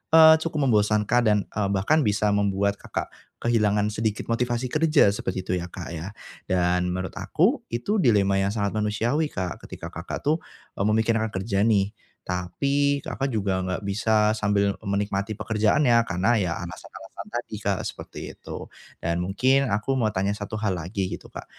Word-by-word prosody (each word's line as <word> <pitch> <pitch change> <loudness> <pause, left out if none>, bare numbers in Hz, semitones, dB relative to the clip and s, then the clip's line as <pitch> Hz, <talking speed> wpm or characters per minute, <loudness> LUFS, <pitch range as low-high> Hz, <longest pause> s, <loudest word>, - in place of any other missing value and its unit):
eee, 160 0 +9
cukup 160 -2 -1
membosankan 105 -1 +3
dan, 105 -1 +4
eee, 100 -2 -2
bahkan 140 +8 +2
bisa 105 0 +2
membuat 100 0 +1
Kakak, - - -5 0.3
kehilangan 105 -3 +2
sedikit 110 +1 -2
motivasi 120 +1 -1
kerja, 155 -8 +4
seperti 95 -2 -3
itu 90 -1 -1
ya 85 - -5
Kak, 90 0 -8
ya. 85 +5 -6 0.3
Dan 90 0 +1
menurut 95 -1 -3
aku, - - +1
itu 200 - -1
dilema 100 - +3
yang 95 - +1
sangat 100 -2 -1
manusiawi 110 +8 0
Kak. 90 - -4
ketika - - -8
Kakak, 85 +2 -6
tuh, 155 +3 +2 0.4
eee, 100 - +1
memikirkan 110 +1 +2
kerja 100 +2 +1
nih, 100 -2 +2 0.3
tapi 140 +11 0
Kakak, 135 - -2
juga 100 -3 0
enggak 95 +2 -3
bisa, 105 +1 +2
sambil 100 -1 +2 0.2
menikmati 100 +1 -1
pekerjaannya, 110 +5 +3
karena 90 +6 +1
ya 90 -4 0
alasan-alasan 85 - -9 0.2
tadi - - -5
Kak, - - 0
seperti - - -7
itu. - - -8 0.3
Dan 85 0 -1
mungkin 130 +9 +2
aku 105 +6 0
mau 115 -4 +2
tanya 95 +1 0
satu 105 +1 -5
hal 105 -3 +1
lagi 95 +4 -3
gitu - - -9
Kak, - - -8
105 Hz, 165 wpm, -25 LUFS, 95-120 Hz, 0.4 s, eee